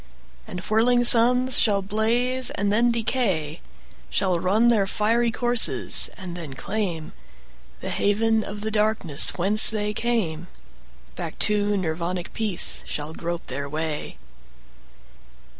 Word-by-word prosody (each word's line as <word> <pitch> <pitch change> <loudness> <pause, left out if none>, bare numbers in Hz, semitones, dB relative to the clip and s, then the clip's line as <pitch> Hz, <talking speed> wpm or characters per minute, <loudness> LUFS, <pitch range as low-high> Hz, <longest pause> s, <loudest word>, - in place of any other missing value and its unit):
And 180 - -7
whirling 240 +5 +1
suns 250 +2 +5
shall 200 -3 +2
blaze 240 +5 0
and 200 0 -2
then 235 +2 +2
decay, 200 - -2 0.5
Shall 185 -3 -1
run 215 +7 +2
their 210 -5 +1
fiery 230 +4 0
courses 240 +1 +1
and 185 -3 -8
then 160 -6 -8
claimThe 180 -2 -4 0.7
haven 220 +2 0
of 205 0 -8
the 220 +1 -4
darkness 210 -8 +4
whence 200 +4 +4
they 210 -1 -2
came; 205 -8 -2 0.7
Back - - -7
to 205 -1 0
Nirvanic 175 0 -4
peace 215 -6 -1
shall 150 +1 -6
grope 170 +1 -6
their 140 +2 -6
way. 155 0 -5
210 Hz, 120 wpm, -23 LUFS, 175-230 Hz, 0.7 s, suns